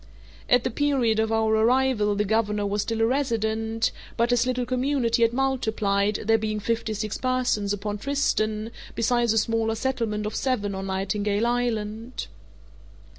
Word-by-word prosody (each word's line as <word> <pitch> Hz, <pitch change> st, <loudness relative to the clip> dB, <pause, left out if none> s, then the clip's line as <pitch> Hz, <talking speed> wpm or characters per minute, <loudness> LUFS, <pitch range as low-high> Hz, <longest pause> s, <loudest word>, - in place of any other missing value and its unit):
At 245 Hz, -1 st, +5 dB
the -, -, -1 dB
period 250 Hz, -4 st, +1 dB
of 220 Hz, 0 st, +1 dB
our 220 Hz, 0 st, +2 dB
arrival 225 Hz, -2 st, +2 dB
the 210 Hz, +1 st, 0 dB
governor 210 Hz, -1 st, 0 dB
was 205 Hz, +1 st, 0 dB
still 225 Hz, +1 st, -2 dB
a -, -, +5 dB
resident, 225 Hz, -3 st, 0 dB, 0.3 s
but 235 Hz, +1 st, +2 dB
his 245 Hz, 0 st, +2 dB
little 250 Hz, -1 st, 0 dB
community 255 Hz, -2 st, 0 dB
had 230 Hz, 0 st, +4 dB
multiplied, 220 Hz, -6 st, 0 dB
there 225 Hz, +1 st, +4 dB
being 215 Hz, -1 st, -2 dB
fifty 225 Hz, +1 st, -2 dB
six 215 Hz, 0 st, -3 dB
persons 250 Hz, -6 st, 0 dB
upon 205 Hz, +1 st, -3 dB
Tristan, 220 Hz, -5 st, 0 dB, 0.2 s
besides 235 Hz, 0 st, +2 dB
a 225 Hz, -, +1 dB
smaller 225 Hz, 0 st, +1 dB
settlement 225 Hz, -4 st, -2 dB
of 210 Hz, -, -3 dB
seven 215 Hz, -7 st, -1 dB
on 190 Hz, 0 st, -4 dB
Nightingale 200 Hz, +3 st, -1 dB
Island. 235 Hz, -1 st, -2 dB
225 Hz, 155 wpm, -25 LUFS, 210-245 Hz, 0.3 s, At